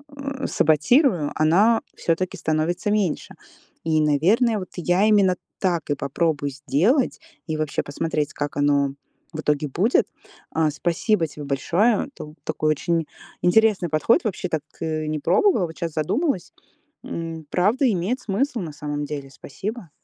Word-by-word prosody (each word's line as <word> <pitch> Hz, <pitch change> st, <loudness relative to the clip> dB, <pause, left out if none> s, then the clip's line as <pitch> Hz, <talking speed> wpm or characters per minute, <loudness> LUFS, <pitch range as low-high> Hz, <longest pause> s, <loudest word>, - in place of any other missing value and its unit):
э, 275 Hz, -1 st, -5 dB
саботирую, 160 Hz, -, +3 dB
она 195 Hz, +9 st, +4 dB
всё-таки 175 Hz, +2 st, -1 dB
становится 160 Hz, +5 st, 0 dB
меньше. 205 Hz, -7 st, -1 dB, 0.5 s
И, 160 Hz, -1 st, +2 dB
наверное, 200 Hz, -, +3 dB
вот 185 Hz, -, -7 dB
я 180 Hz, +3 st, +2 dB
именно 200 Hz, -4 st, +4 dB, 0.2 s
так 175 Hz, -6 st, 0 dB
и 145 Hz, -, +2 dB
попробую 145 Hz, +1 st, -1 dB
сделать, 150 Hz, -, +1 dB, 0.3 s
и 155 Hz, -1 st, -2 dB
вообще 155 Hz, -2 st, -1 dB
посмотреть, 150 Hz, 0 st, -2 dB
как 145 Hz, 0 st, -4 dB
оно 140 Hz, -1 st, +2 dB, 0.4 s
в 155 Hz, -, -6 dB
итоге 150 Hz, 0 st, 0 dB
будет. 200 Hz, -, +2 dB, 0.4 s
А, 160 Hz, -1 st, +2 dB
спасибо 175 Hz, +4 st, +1 dB
тебе 150 Hz, 0 st, -9 dB
большое, 195 Hz, -, +1 dB
тут 150 Hz, +1 st, -9 dB
такой 155 Hz, 0 st, 0 dB
очень 165 Hz, +1 st, 0 dB, 0.3 s
интересный 200 Hz, -1 st, +3 dB
подход. 155 Hz, +9 st, +3 dB
Вообще 190 Hz, -4 st, -2 dB
так, 160 Hz, -3 st, -1 dB, 0.2 s
э, 155 Hz, -1 st, -2 dB
не 155 Hz, -, -1 dB
пробовала, 200 Hz, -, +3 dB
вот 160 Hz, -, -11 dB
щас 165 Hz, -2 st, -3 dB
задумалась. 195 Hz, -, -1 dB, 0.5 s
М, 165 Hz, -1 st, -5 dB
правда 225 Hz, +9 st, +2 dB
имеет 200 Hz, +7 st, -1 dB
смысл, 235 Hz, +5 st, -1 dB
на 155 Hz, -4 st, -6 dB
самом 145 Hz, 0 st, -4 dB
деле. 140 Hz, -2 st, -6 dB
Спасибо. 195 Hz, -, -7 dB
165 Hz, 145 wpm, -23 LUFS, 150-210 Hz, 0.5 s, она